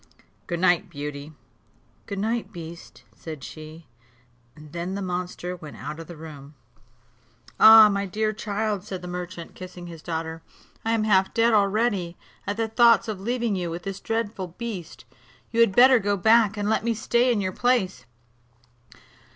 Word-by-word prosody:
Good 175 -1 -3
night, 180 +1 +2
Beauty." 145 -1 -6 0.8
"Good 200 - -5
night, 220 +1 -2
beast," 170 -2 -10
said 155 -5 -9
she; 155 +1 -10 0.7
and 150 -1 -14
then 175 +3 -4
the 200 - -4
monster 180 0 -4
went 155 -4 -11
out 150 +3 -7
of 165 - -9
the 170 - -10
room. 150 -2 -11 1.0
"Ah! 220 -1 +10
my 200 -1 -1
dear 215 +3 -1
child," 210 -2 -2
said 185 -3 -7
the - - -6
merchant, 175 -1 -7
kissing 180 -1 -10
his 165 -2 -10
daughter, 160 -1 -4 0.4
"I 225 - 0
am 225 -1 +1
half 195 -3 +3
dead 230 0 +4
already, 200 -4 +1 0.3
at 205 +1 -2
the 225 -1 0
thoughts 230 +1 +4
of 215 -3 -4
leaving 235 0 -1
you 175 -2 -2
with 170 +1 -6
this 195 -1 -5
dreadful 225 -4 -3
beast; 220 -8 -7 0.5
you 230 - -1
had 230 -5 +4
better 255 0 +7
go 205 0 0
back, 220 +2 +4
and 205 0 -2
let 220 0 +1
me 230 0 0
stay 240 +3 +2
in 230 - +1
your 185 -2 -2
place." 240 - 0
195 Hz, 165 wpm, -25 LUFS, 170-220 Hz, 1.0 s, Ah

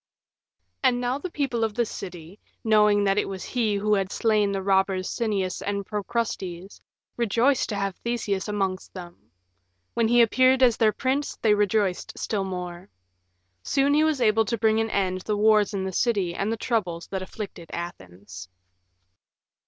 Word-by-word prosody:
And 255 -2 +3
now 250 +2 -1
the 365 - -5
people 270 -8 -1
of 220 -2 -1
the 240 - +1
city, 180 -2 -9 0.2
knowing 210 -2 +4
that 195 0 +2
it - - -2
was 190 -1 -6
he 225 -5 0
who 210 +1 +1
had 195 -1 0
slain 215 -3 +2
the 195 -1 -2
robbers 190 -1 +1
Sinnias 200 -6 -2
and 200 -1 -3
Procrustes, 200 -4 -4 0.4
rejoiced 240 +4 +2
to 210 - -2
have 195 -2 -2
Theseus 215 -5 -2
amongst 195 -3 -3
them. 175 - -11 0.6
When 230 -1 +2
he 240 +1 +6
appeared 255 +3 +4
as 240 -3 +5
their 220 -1 +4
prince 265 +6 -2
they 215 -2 +5
rejoiced 205 -2 0
still 205 -3 -2
more. 180 0 -6 0.7
Soon 280 - +1
he 305 +1 +4
was 310 -4 +1
able 225 -1 +3
to 235 +3 -1
bring 220 0 +2
to - - +3
an 225 - -1
end 185 -3 -1
the 210 +2 -2
wars 215 0 +4
in 195 -2 -2
the 190 - -3
city 200 -6 +1
and 200 +5 -2
the 225 - -2
troubles 185 -8 -2
that 190 -1 -2
afflicted 185 -3 -8
Athens. 95 - -8
210 Hz, 170 wpm, -25 LUFS, 190-230 Hz, 0.7 s, he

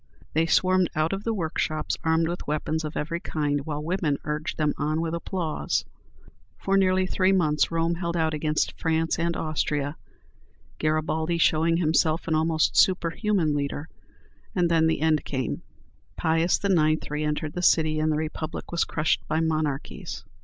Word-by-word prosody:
They 160 +1 +2
swarmed 185 +2 +3
out 155 +4 +1
of 195 +1 -4
the 230 - +1
workshops 155 -3 -1
armed 160 0 +2
with 175 +1 -5
weapons 155 +1 -1
of 155 0 -5
every 165 +3 -2
kind, 145 -4 -1
while 150 -1 -3
women 165 -4 0
urged 150 +1 -3
them 150 -2 +1
on 155 +1 -1
with 165 0 -2
applause. 170 -1 -2 0.7
For 195 - 0
nearly 185 -1 +3
three 185 0 +2
months 155 -6 +2
Rome 165 0 0
held 170 0 -2
out 160 -1 +1
against 150 0 0
France 165 0 0
and 170 0 0
Austria, 150 -2 -1 0.8
Garibaldi 155 +2 0
showing 165 0 +3
himself 160 -1 +1
an 160 - +1
almost 160 0 +2
superhuman 185 -1 +2
leader, 145 +2 -3 0.7
and 175 -2 +2
then 160 -1 +4
the 160 - 0
end 155 -1 +2
came. 130 -3 -3 0.6
Pius 165 +2 +2
IX. 155 -5 +2
re 150 +1 -1
entered 150 0 -2
the 180 - -3
city, 155 -3 +3
and 155 0 +1
the 150 - 0
Republic 155 0 -4
was 170 - +1
crushed 155 0 0
by 160 - 0
monarchies. 155 -3 -2
160 Hz, 160 wpm, -26 LUFS, 155-170 Hz, 0.8 s, then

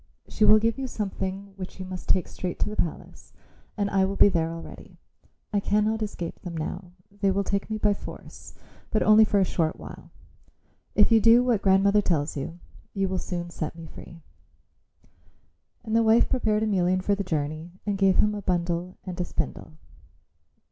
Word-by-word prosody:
She 215 - +1
will 215 - +8
give 225 +4 0
you 265 - -3
something 195 -3 -4
which 185 0 -8
you 185 - -5
must 185 -1 -8
take 185 - +2
straight 180 -2 -5
to - - +1
the - - -5
palace 170 - -5 0.4
and 205 -1 0
I 195 -1 +2
will 195 +1 -1
be 205 - +6
there 165 -3 0
already. 165 0 -10 0.6
I 205 - +3
cannot 210 +2 +1
escape 190 -5 -5
them 175 -3 -7
now; 175 +3 -5 0.2
they 200 -1 0
will 195 +1 +1
take 200 +2 -2
me 215 - -2
by 210 -1 +2
force, - - -11 0.3
but 215 - +1
only 215 +1 +7
for 205 - +1
a 190 - +3
short 160 -3 -1
while. - - -11 0.9
If 210 +2 +5
you 225 -1 +6
do 230 +2 +6
what 240 -5 +1
grandmother 200 +2 +4
tells 155 -6 -1
you, 150 +4 -5 0.4
you 195 -1 +1
will 185 0 -2
soon 175 -1 -5
set 160 -1 -5
me 165 -1 -9
free." 165 +1 -12 1.6
And 220 -1 -2
the 230 - +5
wife 225 +1 +4
prepared 220 -4 +1
Emelian 185 -3 +1
for 205 - +2
the 200 0 -1
journey 155 0 -3
and 205 -1 0
gave 195 -1 +3
him 210 0 +3
a 205 - -5
bundle 175 -1 -2
and 180 -1 -4
a - - +1
spindle. 160 -2 -5
195 Hz, 190 wpm, -26 LUFS, 175-210 Hz, 1.6 s, will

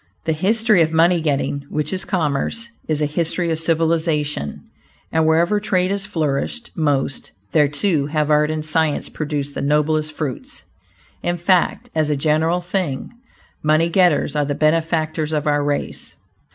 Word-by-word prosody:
The 160 - +1
history 215 +4 +3
of 160 -1 +2
money 170 +1 +3
getting, 140 -2 -1
which 150 +4 -2
is 185 - -2
commerce, 180 +6 -1 0.2
is 155 -1 0
a - - +3
history 165 +3 -1
of 160 - -1
civilization, 160 - 0 0.5
and 160 -1 +2
wherever 170 +6 +3
trade 185 -3 0
has 200 0 -2
flourished 165 - -2
most, 140 -5 -1 0.2
there, 150 -2 +4
too, 145 0 0
have 150 0 0
art 150 0 +3
and 155 -1 -3
science 155 -1 0
produced 145 -2 -3
the - - -4
noblest 150 +2 +1
fruits. 160 - -5 0.6
In 175 0 -1
fact, 175 +1 +1
as 155 -1 +1
a 150 - +1
general 160 +4 +1
thing, 175 -6 -3 0.5
money 155 +2 +2
getters 170 -5 +2
are 150 - +2
the 145 0 -2
benefactors 155 0 0
of 150 -1 -1
our 145 -1 +2
race. 145 0 -3
155 Hz, 155 wpm, -20 LUFS, 150-175 Hz, 0.6 s, there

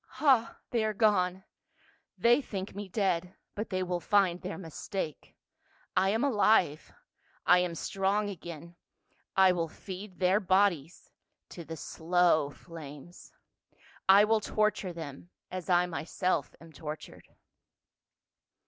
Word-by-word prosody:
" - - -37
Ha! 260 -6 +3
they 235 -3 +1
are 215 -1 -1
gone; 190 -4 +2 0.7
they 240 +4 +4
think 195 -6 -6
me 200 -1 -7
dead, 185 -3 -1 0.2
but 215 +2 -4
they 185 -1 -1
will 180 -1 -2
find 185 -2 +2
their 185 - -5
mistake. 165 -1 -6 0.6
I 190 +1 +3
am 220 +5 +1
alive. 210 - +2 0.5
I 180 - +6
am 180 -2 -1
strong 195 +4 0
again. 170 -3 -8 0.6
I 190 -1 +6
will 170 -2 -1
feed 190 +3 -9
their 185 +2 +3
bodies 185 -5 +1 0.4
to - - -11
108 160 - -12
PA - - -12
UL. - - -7
slow 165 -2 +2
flames. 155 +1 -12 0.8
I 200 +2 +9
will 220 +1 +3
torture 215 -3 0
them 160 -1 -8
— - - -58
as 185 -1 -6
I 175 0 +4
myself 170 -1 -2
am 165 0 -15
tortured." 150 +2 -8
185 Hz, 140 wpm, -30 LUFS, 170-205 Hz, 0.8 s, I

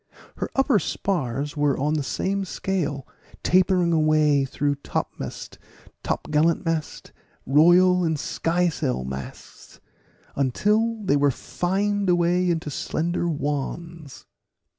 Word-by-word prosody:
Her - - -3
upper 270 -5 +3
spars 145 -6 -2
were 145 -2 +1
on 150 +3 0
the 155 - 0
same 195 +7 -2
scale, 160 -8 -3 0.4
tapering 180 -1 +3
away 155 -3 +3
through 145 +1 -1
topmast, - - -5 0.4
topgallant 155 +3 0
mast, 165 -2 -3 0.3
royal 175 +6 +5
and 160 -2 0
skysail 165 - -1
masts, 65 0 -9 0.6
until 210 - +1
they 145 -7 +2
fined 195 +8 -1
away 175 +1 +2
into 160 -3 -2
slender 170 +5 -2
wands. 150 +1 -4
165 Hz, 100 wpm, -24 LUFS, 145-180 Hz, 0.6 s, royal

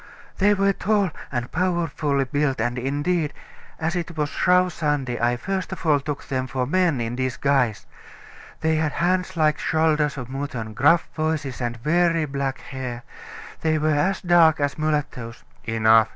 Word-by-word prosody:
"They 205 +1 +4
were 195 0 +2
tall 200 -2 +1 0.2
and 120 -2 -3
powerfully 165 -5 0
built, 135 0 0
and 120 +2 -1
indeed, 145 +4 -1 0.5
as 160 +3 -1
it 170 -2 -4
was 150 -1 0
Shrove 180 +1 +2
Sunday, 145 -7 -1
I 120 +1 +2
first 190 +7 -3
of 190 - -7
all 150 -3 +4
took 145 0 -5
them 130 -1 -2
for 125 +1 -2
men 170 -1 +2
in 115 +1 -2
disguise. 130 -3 0 0.8
They 160 0 +2
had 155 -1 0
hands 180 +1 0
like 155 -2 +2
shoulders 155 -2 +1
of 125 -3 -5
mutton, 130 -5 -5
gruff 160 +9 +4
voices, 155 -5 -2
and 120 -1 -2
very 165 +4 +2
black 140 -2 -3
hair. 125 -3 -6 0.6
They 160 -1 +2
were 155 0 +1
as 185 +7 +1
dark 170 -4 +5
as 145 0 0
mulattoes 150 -7 -3
" - - -31
"Enough!" 110 -1 +4
150 Hz, 165 wpm, -23 LUFS, 130-170 Hz, 0.8 s, dark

